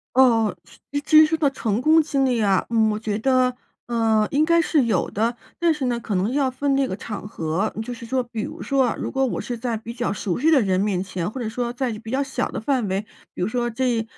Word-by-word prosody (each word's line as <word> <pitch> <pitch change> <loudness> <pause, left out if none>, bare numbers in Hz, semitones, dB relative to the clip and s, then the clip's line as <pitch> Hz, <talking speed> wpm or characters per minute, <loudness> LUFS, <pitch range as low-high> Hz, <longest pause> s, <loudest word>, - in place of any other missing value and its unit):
哦， 225 -7 +4 0.5
至 310 - +6
于 - - +6
说 320 +1 0
到 295 -3 +3
成 225 -4 -1
功 315 +3 +5
经 275 -3 0
历 245 -3 +1
啊， 195 -3 +2
嗯， 220 -2 +3
我 210 - -1
觉 215 -1 -2
得， 255 0 +2 0.3
呃， 225 -2 +2
应 290 +2 +3
该 335 +1 +4
是 310 -5 +2
有 205 -6 0
的， 230 +3 0 0.2
但 340 -1 +4
是 300 -4 -3
呢， 240 -1 0
可 215 -3 -4
能 190 +6 0
要 275 -1 +1
分 275 +2 0
那 275 -1 +1
个 185 - -4
场 205 -1 -7
合。 165 +4 -2
就 245 +2 -6
是 230 0 -10
说 260 +1 0
比 230 -2 -6
如 - - -6
说 275 -1 +2
啊， - - -2
如 - - -3
果 270 0 +1
我 245 - -3
是 245 - -4
在 235 -1 -2
比 230 +2 -7
较 240 -3 -2
熟 190 -4 -2
悉 305 +6 +3
的 300 -4 +5
人 190 -4 +1
面 195 -3 0
前， 185 -1 -3
或 260 - -6
者 225 - -2
说 240 +1 -3
在 250 -1 -2
比 225 0 -9
较 265 +3 +1
小 265 -1 -2
的 - - -4
范 245 -2 0
围， 190 +2 -1 0.3
比 - - -4
如 185 - +1
说 240 +1 -1
这， 240 -1 0
240 Hz, 275 characters per minute, -23 LUFS, 215-265 Hz, 0.5 s, 至